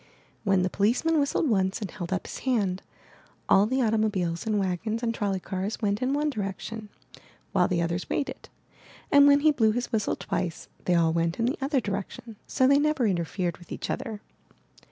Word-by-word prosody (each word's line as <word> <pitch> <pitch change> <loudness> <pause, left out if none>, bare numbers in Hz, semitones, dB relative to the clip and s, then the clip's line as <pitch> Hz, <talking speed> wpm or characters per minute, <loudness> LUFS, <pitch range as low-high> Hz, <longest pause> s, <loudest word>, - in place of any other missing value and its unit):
When 195 -3 +3
the 185 - +1
policeman 250 +11 +2
whistled 285 +2 +1
once 190 -5 +1
and 205 -6 -5
held 175 -3 -6
up 190 - -1
his - - -7
hand, 205 -8 0 0.7
all 200 +2 +5
the 260 +2 +1
auto 220 -1 +2
mobiles 190 -3 -1
and 215 -1 +1
wagons 205 +4 -1
and 230 -1 0
trolley 200 -4 -1
cars 190 +3 -4
went 205 0 0
in 255 +1 +1
one 295 +1 +1
direction, 210 0 -5 0.6
while 180 -2 +3
the 170 -2 0
others 170 0 -3
waited, 280 - -3 0.6
and 285 0 +7
when 285 0 +6
he 310 +1 +5
blew 220 -6 +2
his 245 +1 -3
whistle 220 -3 0
twice, 170 -2 -4 0.2
they 180 - +3
all 165 -1 +3
went 165 0 0
in 230 - 0
the 250 - 0
other 275 0 +1
direction; 205 +1 -5
so 260 - +2
they 280 +2 +5
never 300 -4 +1
interfered 175 -2 -1
with 175 - -16
each - - -4
other. 215 -2 -4
210 Hz, 195 wpm, -27 LUFS, 185-250 Hz, 0.7 s, and